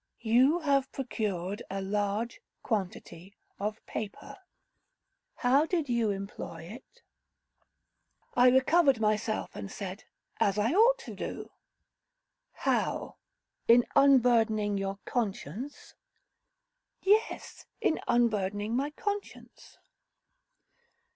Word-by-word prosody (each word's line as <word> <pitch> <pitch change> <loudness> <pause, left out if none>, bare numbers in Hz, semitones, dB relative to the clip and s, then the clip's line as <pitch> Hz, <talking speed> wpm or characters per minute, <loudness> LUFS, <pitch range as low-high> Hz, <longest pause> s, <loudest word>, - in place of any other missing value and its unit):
'You 255 +9 +3
have 275 -3 +1
procured 205 -7 -3
a 195 - -3
large 205 +3 -2 0.2
quantity 190 -2 -4 0.2
of 210 +2 -4
paper— 210 -2 -6 1.0
how 270 +5 +3
did 325 -6 -1
you 235 -3 +1
employ 195 -4 -6
it?' 220 +10 -13 1.3
I 250 +1 +6
recovered 270 +1 +4
myself, 215 0 -1
and 100 -2 -6
said, 195 +1 -7 0.3
'As 205 -3 +2
I 215 +4 +2
ought 460 +8 +5
to - - -7
do.' - - -6 1.0
'How, - - -1 0.5
in 235 +1 +6
unburdening 230 -6 +4
your 195 0 -2
conscience?' 230 - -4 1.1
'Yes, 425 +3 0
in 425 -8 +1
unburdening 210 -2 +1
my 275 +3 0
conscience.' 410 +5 -6
225 Hz, 95 wpm, -29 LUFS, 200-270 Hz, 1.3 s, I